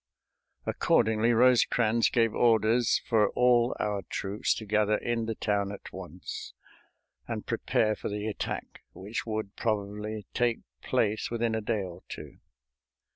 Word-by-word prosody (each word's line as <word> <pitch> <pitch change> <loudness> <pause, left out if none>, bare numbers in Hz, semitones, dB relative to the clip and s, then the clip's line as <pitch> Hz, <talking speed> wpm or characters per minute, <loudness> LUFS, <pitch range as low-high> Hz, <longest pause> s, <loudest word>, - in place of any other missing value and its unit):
Accordingly, 110 +1 +2
Rosecrans 120 -1 +4
gave 115 -3 +2
orders 115 +1 +3
for 110 -2 +3
all 125 -1 +4
our 105 -1 -1
troops 100 +2 -1
to 110 - -6
gather 105 0 +2
in 115 -1 -2
the 115 - -2
town 100 -2 0
at 100 - -9
once - - -8 0.7
and - - -4
prepare 110 0 +1
for - - -5
the 105 0 -3
attack 110 - -4
which 105 +5 -5
would 110 -2 -3
probably 105 -1 -2
take 120 -2 +1 0.2
place 105 0 0
within 115 -1 0
a 110 - -1
day 105 -1 -1
or 90 -1 -8
two. - - -9
110 Hz, 135 wpm, -29 LUFS, 105-115 Hz, 0.7 s, Rosecrans